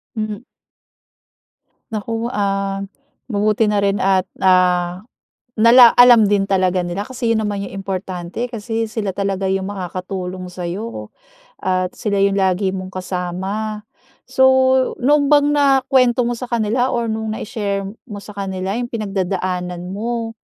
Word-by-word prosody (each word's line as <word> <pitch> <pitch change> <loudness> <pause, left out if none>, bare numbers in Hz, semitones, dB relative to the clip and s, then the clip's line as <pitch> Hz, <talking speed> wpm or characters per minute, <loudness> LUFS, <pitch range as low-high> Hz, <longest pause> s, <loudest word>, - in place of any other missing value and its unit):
Hmm. 215 0 -4 1.5
Naku, 225 +2 -3
ah, 195 -1 -1 0.4
mabuti 215 -1 +1
na 210 -1 +1
rin 200 0 +1
at, 190 -1 +1
ah, 180 -1 +2 0.5
nala 235 +2 +7
alam 240 -4 +7
din 205 -1 +2
talaga 185 -2 +1
nila 175 +2 -4
kasi 240 -3 -1
yun, 220 - +1
naman 205 -2 -2
yung - - -8
importante 185 +1 -4
kasi, 225 0 -3
sila 205 -4 -3
talaga 195 -1 -1
yung 190 +1 -1
makakatulong 185 -1 -5
sa'yo 185 +6 -5 0.5
at 185 -1 -1
sila 210 -3 -2
yung 200 0 +1
lagi 190 0 +1
mong 185 -1 -5
kasama. 190 +4 -4 0.4
So, 265 - +3 0.6
noon 285 +2 +3
bang 290 -1 +4
nakuwento 265 -3 +3
mo 240 - 0
sa 250 0 -7
kanila, 235 +2 +1
or 235 -1 -1
nung 220 0 -3
nai-share 205 -4 -3 0.2
mo 205 -2 -7
sa 210 - -11
kanila 190 0 -3
yung 240 0 -3
pinagdadaanan 185 -4 -3
mo, 230 +2 -3
200 Hz, 135 wpm, -19 LUFS, 185-230 Hz, 1.5 s, nala